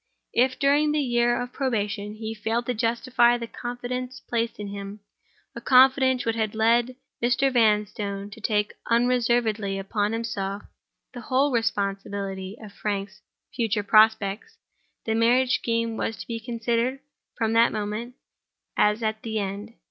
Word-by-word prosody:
If, 255 +2 +2
during 295 +2 +3
the 305 - +1
year 240 -3 +2
of 245 0 -5
probation, 210 -5 -2
he 220 0 -5
failed 225 +2 -2
to 250 - -1
justify 240 +1 +2
the 235 - -5
confidence 245 +2 -5
placed 230 -2 -3
in 205 -1 -5
him—a 200 +1 -11
confidence 260 0 +5
which 225 0 0
had 220 -1 -1
led 235 +3 +2 0.3
Mr. 250 +3 +2
Vanstone 210 -3 +1
to 225 - -11
take 210 -1 0 0.2
unreservedly 235 -4 +1
upon 205 +2 -1
himself 205 -3 -3 0.5
the 245 - -7
whole 265 +4 +1
responsibility 200 -3 -2
of 210 -2 -11
Frank's 200 0 -4 0.3
future 225 -3 0
prospects—the 215 - +1
marriage 245 +3 +3
scheme 230 -1 -1
was 225 - -2
to - - -8
be 230 -1 -4
considered, 235 +2 -1 0.4
from 225 0 0
that 230 +1 +5
moment, 215 +3 -4 0.6
as 210 +2 +2
at 220 0 -2
an 220 -1 -3
end. 205 +2 -4
225 Hz, 140 wpm, -25 LUFS, 210-245 Hz, 0.6 s, confidence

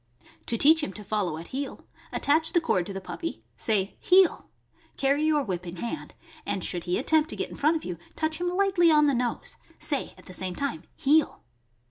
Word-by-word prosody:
To 230 - 0
teach 315 +5 +6
him 295 - -3
to 210 - -7
follow 195 -6 -1
at 165 - -9
heel, 270 +1 -5 0.3
attach 315 +3 +1
the 345 - +5
cord 185 - 0
to - - -5
the 195 - -4
puppy; 330 - -6
say 200 -3 0
"Heel!" 370 -1 +4 0.5
Carry 280 +2 +2
your 305 -2 +2
whip 180 -5 -4
in 170 - -6
hand, 235 - -6 0.3
and 190 - -3
should 175 -2 -1
he 180 0 0
attempt 315 +4 +2
to - - -3
get - - -4
in - - -8
front 305 +3 +2
of - - -8
you, 175 -2 -5 0.2
touch 315 0 -2
him 355 - 0
lightly 370 -2 +3
on 300 -1 +5
the 285 - +3
nose; 245 -1 -2 0.2
say - - -1
at - - -16
the 185 - -9
same 185 0 -1
time 180 - -3
"Heel!" 300 +2 +2
275 Hz, 210 wpm, -27 LUFS, 190-315 Hz, 0.5 s, teach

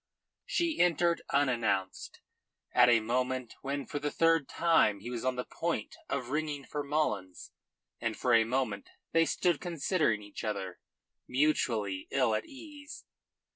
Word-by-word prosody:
She 340 -10 0
entered 170 -1 +3
unannounced, 120 -9 0 0.5
at 125 0 +6
a 115 -2 +5
moment 125 +1 -1
when 140 0 -3
for 145 - -4
the 145 +1 -1
third 165 -2 +2
time 165 -12 +3
he 120 +5 -7
was 120 -2 -4
on 130 0 0
the 125 - -2
point 165 -10 -3
of 130 -3 -2
ringing 150 -1 -2
for 145 +3 -4
Mullins, 140 -11 -2 0.5
and 115 -2 -2
for 125 - +1
a 115 -1 +6
moment 115 -4 -2 0.2
they 165 0 +4
stood 175 -2 +1
considering 160 - 0
each 105 0 -8
other 100 -4 -4 0.5
mutually 115 -9 0
ill 130 -5 +2
at 110 - -2
ease. 290 +1 -11
130 Hz, 145 wpm, -31 LUFS, 115-155 Hz, 0.5 s, at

